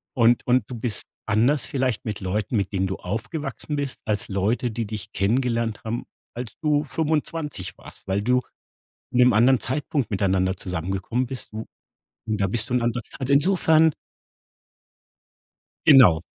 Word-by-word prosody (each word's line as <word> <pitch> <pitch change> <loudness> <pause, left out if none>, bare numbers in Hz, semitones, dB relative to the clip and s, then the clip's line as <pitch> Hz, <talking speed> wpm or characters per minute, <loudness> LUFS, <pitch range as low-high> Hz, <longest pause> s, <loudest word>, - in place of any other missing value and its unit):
und 120 -1 +4
und 125 -1 +4
du 125 - -6
bist 115 -2 -3 0.2
anders 120 +6 +2
vielleicht 130 -5 -1
mit 105 -2 -3
Leuten, 95 +3 -2
mit 100 -2 -1
denen 95 0 +1
du 95 - -3
aufgewachsen 125 - -4
bist, 140 -2 -3
als 105 -2 -1
Leute, 110 +5 0
die 115 +1 -3
dich 105 -1 -6
kennengelernt 115 +1 0
haben, 115 +2 -3 0.3
als 120 -3 -6
du 150 -2 +2
25 150 - -2
warst, - - -14
weil 95 +1 0
du 125 +2 +3 0.7
in 125 - -1
'nem 125 0 +6
anderen 125 +2 +5
Zeitpunkt 135 +2 -2
miteinander 95 -2 +1
zusammengekommen 95 +7 -2
bist, 130 -3 -7
w 110 +1 -5 0.6
und 105 -1 -1
da 100 - +3
bist 115 +3 -1
du - - 0
ein 125 - +2
anderer 120 +1 0 0.2
also, 130 +1 -1
insofern 160 -1 +4 1.9
Genau. 125 - +8
115 Hz, 155 wpm, -24 LUFS, 100-130 Hz, 1.9 s, Genau